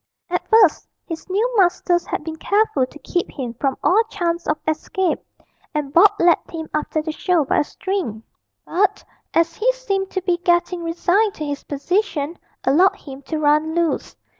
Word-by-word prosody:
At 355 - -1
first 440 -7 +4 0.2
his 330 +2 -7
new 440 +7 0
masters 350 -2 +2
had - - -3
been 320 0 -6
careful 410 -8 +1
to 280 - -13
keep 355 -1 -1
him 250 -5 -5
from 265 +3 -1
all 420 +5 +5
chance 340 -4 -2
of - - +1
escape, 330 +4 0 0.6
and 290 -2 -2
Bob 390 +5 +8
led 345 -1 +5
him 320 -1 -6
after 305 0 -1
the 315 - -3
show 335 -1 +1
by - - +2
a - - +3
string; 325 - -4 0.4
but, 395 +3 +1 0.3
as 330 0 +3
he 470 +8 +2
seemed 395 -6 -2
to 375 - -3
be 355 -2 +1
getting 345 0 +1
resigned 355 +5 +1
to 305 - -4
his 290 -1 -4
position, 330 +1 -1 0.2
allowed 340 +9 +4
him 275 -1 -11
to 315 - -2
run 305 +1 +2
loose. 340 -2 -1
340 Hz, 175 wpm, -21 LUFS, 305-380 Hz, 0.6 s, Bob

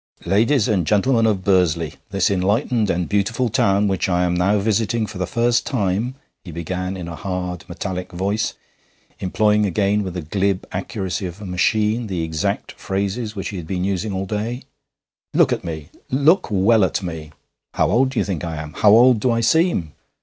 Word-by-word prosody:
'Ladies 110 +7 +3
and 95 -7 +1
gentlemen 115 +2 +3
of 100 -4 0
Bursley, 85 -5 +2 0.2
this 100 -1 +1
enlightened 105 +4 +1
and 90 -1 0
beautiful 110 +5 0
town 100 -1 +2
which 95 -1 0
I 90 0 +2
am 90 -1 +1
now 90 +4 +2
visiting 110 +2 0
for 105 - -8
the 90 - -1
first 120 0 +1
time,' 110 +2 -1 0.3
he 90 - -9
began 90 +3 -4
in 90 -2 -6
a 85 - -6
hard, 90 -1 -4
metallic 90 0 -5
voice, 100 +5 -1 0.6
employing 105 +3 +2
again 100 +2 +1
with 95 -3 -5
the 90 - -4
glib 95 +4 -1
accuracy 95 -1 -3
of 90 +3 -9
a 105 - -8
machine 105 +5 +1
the 90 -4 -2
exact 80 -1 -2
phrases 100 +3 -3
which 95 - -4
he 100 - -6
had 85 -3 -7
been 90 0 -2
using 100 +2 -1
all 95 0 -2
day, 110 +6 -3 0.7
'look - - +4
at - - -4
me 80 -3 -6 0.2
look 155 +8 +3
well 105 +2 +4
at 95 - 0
me. 80 -4 -6 0.4
How - - +2
old 130 +2 +3
do 130 - -7
you - - +2
think 95 -6 -3
I 85 -1 -3
am? 75 0 -7
How 105 - +4
old 120 +2 +6
do 125 - +1
I 115 -1 +1
seem? 140 - +2
100 Hz, 190 wpm, -21 LUFS, 90-110 Hz, 0.7 s, old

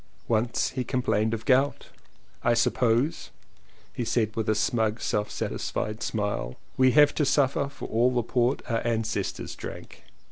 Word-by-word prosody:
Once 115 +1 +1
he 130 -1 -2
complained 120 -4 0
of 115 0 -4
gout. 135 +2 +2 0.5
"I 120 0 +3
suppose," 120 +4 +1 0.6
he 120 - -3
said 110 -2 0
with 110 -1 -1
a 110 - +3
smug 110 0 0
self 105 0 -1
satisfied 105 +1 -3
smile, 100 - -2 0.2
"we 130 -1 +4
have 145 -1 +6
to 155 - +1
suffer 140 0 +2
for 140 - -9
all 120 +3 +3
the 125 -2 0
port 125 +3 0
our 115 -2 0
ancestors 110 -4 -2
drank." - - -9
115 Hz, 150 wpm, -27 LUFS, 110-130 Hz, 0.6 s, have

